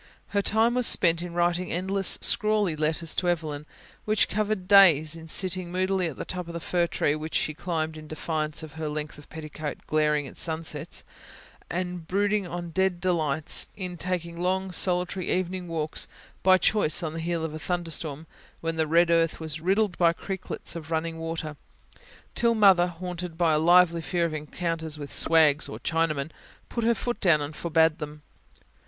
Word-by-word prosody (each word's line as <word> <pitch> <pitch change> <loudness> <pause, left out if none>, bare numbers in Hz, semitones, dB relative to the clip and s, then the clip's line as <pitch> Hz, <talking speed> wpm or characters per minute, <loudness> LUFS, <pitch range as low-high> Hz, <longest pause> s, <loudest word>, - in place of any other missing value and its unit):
Her 200 - +1
time 225 +4 +2
was 250 -1 +5
spent 170 -2 +5
in 175 -1 -6
writing 175 +1 0
endless, 190 +2 0
scrawly 210 -5 +2
letters 155 +1 -1
to 180 - 0
Evelyn, 155 -3 -3 0.4
which 215 0 +2
covered 210 -2 -1
days; 165 -6 +6
in 165 0 -10
sitting 185 +1 0
moodily 185 0 0
at 155 - -7
the - - -5
top 180 -2 -4
of 170 - -8
the - - -3
fir 175 0 0
tree 145 - 0
which 155 +1 -5
she 155 - +1
climbed 160 -1 -3
in 155 0 -10
defiance 155 0 -3
of 155 - -9
her 155 - -2
length 150 0 -5
of 145 - -16
petticoat 155 -1 -7
glaring 150 -1 +1
at - - -9
sunsets, 160 -1 -2 0.7
and 180 -1 -4
brooding 205 0 +1
on 175 0 -6
dead 190 0 +1
delights; 160 -5 +1
in 180 -3 -5
taking 170 -1 -4
long, 190 +1 0
solitary, 180 0 0
evening 185 0 -2
walks, 160 -2 -2 0.3
by 185 0 +6
choice 185 -5 +2
on 155 -1 -3
the 165 - -5
heel 165 0 -2
of 155 - -5
a 155 - -6
thunderstorm, 160 -3 -3 0.3
when 165 0 -3
the 160 -1 +2
red 170 +2 +4
earth 165 -1 +2
was 160 -1 -5
riddled 195 +2 +1
by 170 -2 +5
creeklets 190 0 -5
of 160 -1 -7
running 165 0 -2
water; 160 -2 -5 0.8
till 235 -1 +2
Mother, 190 -5 +6
haunted 175 -1 -6
by 165 -2 +3
a 155 - +3
lively 170 0 +5
fear 170 +1 0
of 165 - -3
encounters 160 +1 -3
with 145 -1 -7
"swags" 155 -3 +4
or - - -6
Chinamen, 160 -3 -1 0.4
put 235 - -3
her 235 +1 +3
foot 240 +1 -3
down 170 -5 +4
and 145 +1 -5
forbade 160 -1 +2
them. 150 0 -8
170 Hz, 180 wpm, -26 LUFS, 155-185 Hz, 0.8 s, days